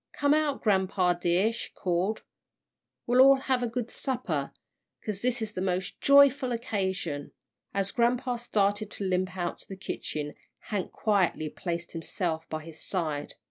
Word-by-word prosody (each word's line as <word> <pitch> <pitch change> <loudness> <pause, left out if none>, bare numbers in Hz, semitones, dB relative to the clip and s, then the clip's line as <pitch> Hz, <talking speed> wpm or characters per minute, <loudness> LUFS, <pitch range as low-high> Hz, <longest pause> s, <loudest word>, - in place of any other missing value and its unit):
"Come 285 0 +3
out, 305 -2 +1
grampa 190 -3 +2
dear," 185 +7 +3
she 235 - -5
called, 185 +3 -1 0.8
"we'll 245 +2 +5
all 275 +1 +9
have 260 -2 +1
a 245 - 0
good 235 0 -3
supper, 195 - -2 0.5
'cause 205 -2 -3
this 245 -1 +1
is 215 0 -5
a 185 - -2
most 185 0 -2
joyful 280 -3 +5
'casion." 190 - -3 0.4
As 195 0 0
grampa 245 +1 +1
started 205 -2 +1
to 205 - -5
limp 185 0 0
out 175 -1 -2
to - - -10
the 195 - -8
kitchen, 150 -5 -4 0.4
Hank 200 -3 -2
quietly 185 -7 +1
placed 170 +2 -4
himself 165 0 -3
by 155 0 -4
his 160 0 -10
side. 155 -6 -2
195 Hz, 155 wpm, -28 LUFS, 175-240 Hz, 0.8 s, all